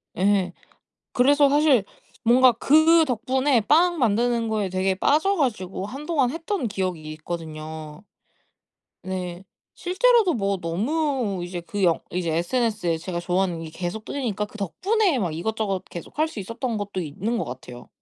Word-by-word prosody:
예. 190 Hz, -1 st, +2 dB, 0.6 s
그래서 280 Hz, +3 st, +4 dB
사실 285 Hz, -7 st, +4 dB, 0.4 s
뭔가 250 Hz, +2 st, +6 dB
그 315 Hz, +7 st, +5 dB
덕분에 260 Hz, +1 st, +1 dB
빵 340 Hz, +7 st, +3 dB
만드는 235 Hz, 0 st, +1 dB
거에 210 Hz, -3 st, -1 dB
되게 185 Hz, +1 st, 0 dB
빠져 315 Hz, -, +2 dB
가지고 200 Hz, -, -2 dB
한동안 275 Hz, +2 st, -1 dB
했던 330 Hz, -, -2 dB
기억이 185 Hz, -5 st, -3 dB
있거든요. 155 Hz, 0 st, -7 dB, 1.0 s
네. 180 Hz, -1 st, -5 dB, 0.8 s
실제로도 355 Hz, -, +2 dB
뭐 200 Hz, -4 st, 0 dB
너무 225 Hz, -, -1 dB
이제 175 Hz, -1 st, -5 dB
그 200 Hz, +3 st, -4 dB
영 170 Hz, -2 st, +3 dB
이제 175 Hz, -2 st, -1 dB
SNS에 205 Hz, -2 st, 0 dB
제가 170 Hz, +1 st, -4 dB
좋아하는 175 Hz, -2 st, -1 dB
게 160 Hz, -, -7 dB
계속 175 Hz, +6 st, -5 dB
뜨니까 225 Hz, -6 st, -3 dB
그 215 Hz, -, -13 dB
덕분에 370 Hz, -, +1 dB
막 175 Hz, -7 st, -1 dB
이것저것 195 Hz, +2 st, -2 dB
계속 170 Hz, -, -10 dB
할 310 Hz, -, +3 dB
수 315 Hz, -, -8 dB
있었던 230 Hz, +3 st, -3 dB
것도 200 Hz, -2 st, -4 dB
있는 190 Hz, +9 st, -3 dB
거 -, -, -2 dB
같아요. 125 Hz, 0 st, -9 dB
210 Hz, 305 characters per minute, -24 LUFS, 180-265 Hz, 1.0 s, 뭔가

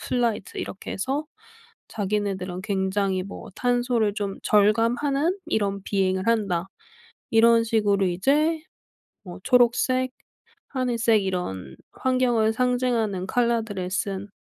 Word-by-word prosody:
플라이트 235 Hz, -6 st, -2 dB
이렇게 190 Hz, -, -6 dB
해서 270 Hz, +9 st, -2 dB, 0.6 s
자기네들은 195 Hz, -3 st, -2 dB
굉장히 190 Hz, -1 st, 0 dB
뭐 195 Hz, -, -9 dB
'탄소를 245 Hz, -4 st, +1 dB
좀 200 Hz, -2 st, -4 dB
절감하는 240 Hz, -, +2 dB
이런 200 Hz, -2 st, -1 dB
비행을 190 Hz, 0 st, 0 dB
한다.' 195 Hz, -6 st, +1 dB, 0.6 s
이런 230 Hz, 0 st, +5 dB
식으로 205 Hz, -4 st, +2 dB
이제 295 Hz, -, +1 dB, 0.6 s
뭐 180 Hz, -2 st, -9 dB
초록색 255 Hz, +1 st, +3 dB, 0.6 s
,하늘색 235 Hz, -5 st, +1 dB
이런 95 Hz, -, -4 dB, 0.2 s
환경을 245 Hz, -4 st, +1 dB
상징하는 240 Hz, -6 st, 0 dB
컬러들을 225 Hz, -5 st, 0 dB
쓴 195 Hz, +1 st, -2 dB
220 Hz, 255 characters per minute, -24 LUFS, 195-245 Hz, 0.6 s, 이런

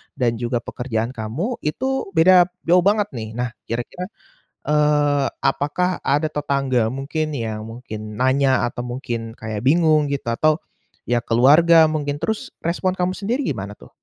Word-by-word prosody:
dan 120 Hz, -3 st, 0 dB
juga 120 Hz, 0 st, -2 dB
pekerjaan 120 Hz, -2 st, -3 dB
kamu 130 Hz, -, -4 dB
itu 260 Hz, -, -3 dB
beda 175 Hz, +2 st, +6 dB, 0.2 s
jauh 175 Hz, +2 st, +4 dB
banget 205 Hz, 0 st, +2 dB
nih. 110 Hz, -3 st, -7 dB
Nah 125 Hz, 0 st, -2 dB, 0.2 s
kira-kira, 120 Hz, +10 st, -4 dB, 0.6 s
eee, 150 Hz, -2 st, +2 dB, 0.2 s
apakah 180 Hz, +7 st, 0 dB
ada 150 Hz, +2 st, 0 dB
tetangga 135 Hz, -5 st, 0 dB
mungkin 140 Hz, +5 st, -3 dB
yang 110 Hz, -3 st, -3 dB
mungkin 110 Hz, -3 st, -8 dB
nanya, 130 Hz, +2 st, +2 dB
atau -, -, -6 dB
mungkin 120 Hz, -2 st, -5 dB
kayak 110 Hz, -1 st, -5 dB
bingung 155 Hz, -1 st, +4 dB
gitu 140 Hz, -1 st, -3 dB
atau, 155 Hz, +6 st, +2 dB, 0.5 s
ya 120 Hz, 0 st, +2 dB
keluarga 155 Hz, +8 st, +6 dB
mungkin? 145 Hz, -2 st, -2 dB
Terus 220 Hz, +4 st, -3 dB
respon 180 Hz, +2 st, 0 dB
kamu 185 Hz, 0 st, -1 dB
sendiri 230 Hz, +7 st, -2 dB
gimana 100 Hz, +1 st, -4 dB
tuh? -, -, -16 dB
140 Hz, 145 wpm, -21 LUFS, 120-165 Hz, 0.6 s, beda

